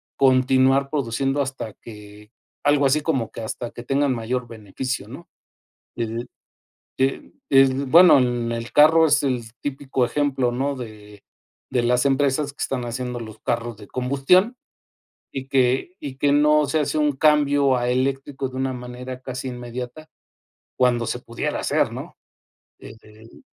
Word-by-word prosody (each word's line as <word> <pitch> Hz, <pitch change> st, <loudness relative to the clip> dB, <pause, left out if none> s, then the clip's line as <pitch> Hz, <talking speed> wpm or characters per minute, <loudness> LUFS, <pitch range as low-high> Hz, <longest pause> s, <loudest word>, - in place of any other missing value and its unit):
continuar 130 Hz, +1 st, +3 dB
produciendo 135 Hz, 0 st, -1 dB
hasta 130 Hz, -6 st, -6 dB
que, 105 Hz, -1 st, -13 dB, 0.3 s
algo 145 Hz, -1 st, +3 dB
así 150 Hz, +3 st, +2 dB
como 135 Hz, -8 st, -1 dB
que -, -, -8 dB
hasta 115 Hz, +2 st, -5 dB
que 120 Hz, -, -10 dB
tengan 135 Hz, +1 st, +1 dB
mayor 120 Hz, +2 st, -3 dB
beneficio, 110 Hz, +1 st, -5 dB
¿no? 135 Hz, +9 st, -11 dB, 0.7 s
El, 115 Hz, +1 st, -4 dB, 0.7 s
eh, 135 Hz, +1 st, -1 dB, 0.2 s
el, 135 Hz, 0 st, +4 dB
bueno, 170 Hz, +2 st, +7 dB
el 120 Hz, -2 st, 0 dB
el 115 Hz, 0 st, -5 dB
carro 160 Hz, +2 st, +6 dB
es 145 Hz, -2 st, +3 dB
el 130 Hz, -3 st, 0 dB, 0.2 s
típico 135 Hz, -2 st, -2 dB
ejemplo, 130 Hz, -1 st, 0 dB
¿no? 135 Hz, +3 st, -1 dB
de 105 Hz, -4 st, -10 dB, 0.5 s
de 125 Hz, -, +1 dB
las 125 Hz, +2 st, +2 dB
empresas 140 Hz, +1 st, +1 dB
que 140 Hz, -, -7 dB
están 125 Hz, -2 st, -2 dB
haciendo 125 Hz, +1 st, -4 dB
los 110 Hz, -2 st, -10 dB
carros 120 Hz, -1 st, -2 dB
de 105 Hz, -, -13 dB
combustión, 140 Hz, -, +2 dB, 0.8 s
y 135 Hz, -1 st, -5 dB
que 130 Hz, +6 st, +1 dB
y 140 Hz, -3 st, -7 dB
que 140 Hz, +1 st, +2 dB
no 150 Hz, +1 st, +4 dB
se 155 Hz, +3 st, 0 dB
hace 150 Hz, +1 st, -1 dB
un 150 Hz, -1 st, +2 dB
cambio 145 Hz, -1 st, +3 dB
a 120 Hz, 0 st, -1 dB
eléctrico 135 Hz, +1 st, -1 dB
de 130 Hz, -, -11 dB
una 130 Hz, 0 st, -1 dB
manera 125 Hz, +1 st, -7 dB
casi 130 Hz, 0 st, -5 dB
inmediata 125 Hz, +5 st, -7 dB, 0.7 s
cuando 120 Hz, -2 st, +2 dB
se 120 Hz, +2 st, -3 dB
pudiera 115 Hz, -1 st, -4 dB
hacer, -, -, +1 dB
¿no? -, -, -8 dB, 0.6 s
Desde 110 Hz, 0 st, -14 dB
ahí. 115 Hz, -, -17 dB
130 Hz, 155 wpm, -22 LUFS, 120-140 Hz, 0.8 s, bueno